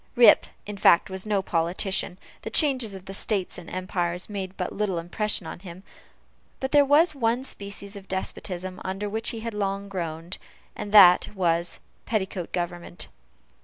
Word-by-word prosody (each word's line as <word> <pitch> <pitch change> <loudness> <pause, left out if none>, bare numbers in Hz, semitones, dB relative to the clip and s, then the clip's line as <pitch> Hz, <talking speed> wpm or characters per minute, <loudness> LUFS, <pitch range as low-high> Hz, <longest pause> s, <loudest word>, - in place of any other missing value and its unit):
Rip, 240 -1 +7 0.2
in 205 0 -6
fact, 180 -1 +5
was 190 +2 -4
no 200 -2 +1
politician; 180 +2 0 0.2
the - - -5
changes 255 -9 +3
of 190 0 -11
states 195 -3 -2
and 170 - -11
empires 180 0 -2
made 195 -2 -5
but 180 - -3
little 200 -3 -1
impression 180 +3 -1
on - - -7
him; 180 0 -11 0.8
but 265 +1 -3
there 290 -1 +7
was 300 +4 +5
one 245 -2 0
species 200 -4 -6
of 195 -1 -10
despotism 185 -1 -4
under 195 +2 -3
which 220 +2 -1
he 225 - -4
had 230 0 -4
long 200 -1 -2
groaned, 170 -1 -4 0.4
and 205 - -6
that 185 -4 +8
was 170 -2 0 0.3
petticoat 190 -5 -2
government. 175 0 -4
195 Hz, 160 wpm, -26 LUFS, 180-210 Hz, 0.8 s, that